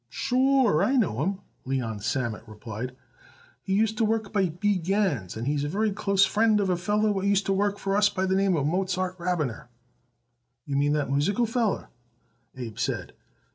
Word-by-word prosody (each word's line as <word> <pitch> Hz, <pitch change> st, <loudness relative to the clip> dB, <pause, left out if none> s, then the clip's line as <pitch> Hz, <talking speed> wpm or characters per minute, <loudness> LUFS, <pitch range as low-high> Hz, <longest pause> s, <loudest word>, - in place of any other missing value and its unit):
"Sure 255 Hz, -, +2 dB
I 270 Hz, -, +2 dB
know 170 Hz, -, +1 dB
him," 195 Hz, +4 st, -1 dB, 0.2 s
Leon 125 Hz, -5 st, -2 dB
Sammet 115 Hz, +1 st, -2 dB
replied. 110 Hz, +3 st, -7 dB, 0.7 s
"He 190 Hz, -, -3 dB
used 220 Hz, +1 st, +1 dB
to -, -, +3 dB
work 220 Hz, -1 st, 0 dB
by 195 Hz, -4 st, +2 dB
B. 195 Hz, +5 st, 0 dB
Gans, 170 Hz, -, -1 dB
and 115 Hz, -, -4 dB
he's 145 Hz, +1 st, 0 dB
a 145 Hz, -, -2 dB
very 210 Hz, +5 st, 0 dB
close 200 Hz, -1 st, +2 dB
friend 215 Hz, 0 st, +3 dB
of 195 Hz, -2 st, +1 dB
a -, -, +2 dB
feller 210 Hz, +4 st, +1 dB
what 195 Hz, -1 st, -2 dB
used 200 Hz, 0 st, +2 dB
to 195 Hz, -, +1 dB
work 205 Hz, +1 st, 0 dB
for 195 Hz, 0 st, -1 dB
us 205 Hz, 0 st, +4 dB
by 190 Hz, -2 st, -1 dB
the 190 Hz, -, +1 dB
name 195 Hz, 0 st, +2 dB
Mozart 185 Hz, +4 st, 0 dB
Rabiner." 160 Hz, -10 st, -2 dB, 1.0 s
"You 140 Hz, -, -3 dB
mean 145 Hz, +1 st, +2 dB
that 145 Hz, -3 st, -1 dB
musical 200 Hz, -, +2 dB
feller?" 225 Hz, -2 st, -1 dB, 0.7 s
Abe 120 Hz, -2 st, -7 dB
said. 125 Hz, -, -2 dB
190 Hz, 180 wpm, -26 LUFS, 140-205 Hz, 1.0 s, us